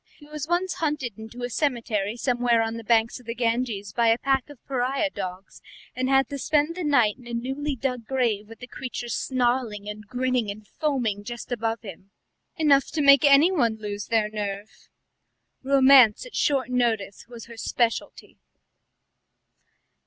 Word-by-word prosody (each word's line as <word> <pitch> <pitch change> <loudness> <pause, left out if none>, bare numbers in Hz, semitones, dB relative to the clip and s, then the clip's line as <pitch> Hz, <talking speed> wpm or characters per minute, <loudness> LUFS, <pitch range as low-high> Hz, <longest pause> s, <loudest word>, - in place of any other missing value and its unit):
He 295 - -16
was 300 0 -6
once 355 +2 0
hunted 295 - -3
into 225 +3 -9
a 245 - -2
cemetery 230 -6 -1
somewhere 240 -2 +2
on 225 0 -3
the 230 0 -7
banks 225 +2 +2
of 245 - -19
the 230 - -4
Ganges 230 -4 -1
by 235 -1 +2
a 225 0 +4
pack 270 +1 0
of 290 - -12
pariah 270 +3 -1
dogs, 185 -2 -7 0.3
and 255 +1 -1
had 270 -1 +4
to 280 - -5
spend 300 +4 +1
the 365 - -4
night 245 -7 +2
in 245 - -14
a 235 - -4
newly 270 +4 -3
dug 250 -3 -3
grave 235 -6 0
with 225 - -13
the - - -6
creatures 245 -2 -6
snarling 240 -5 -1
and 210 0 -8
grinning 250 -1 -1
and 205 +1 -8
foaming 240 - -2
just 240 +3 -8
above 230 -1 -2
him. 195 -1 -11 0.5
Enough 285 -4 +4
to 315 - -2
make 280 -1 +7
anyone 285 -4 +4
lose 205 -1 -6
their 225 -2 +2
nerve." 205 0 -6 0.7
Romance 265 - +6
at - - -11
short 270 -3 +1
notice 225 -6 -1
was 235 -2 -10
her 235 - -12
speciality. 230 0 -2
245 Hz, 165 wpm, -25 LUFS, 220-275 Hz, 0.7 s, make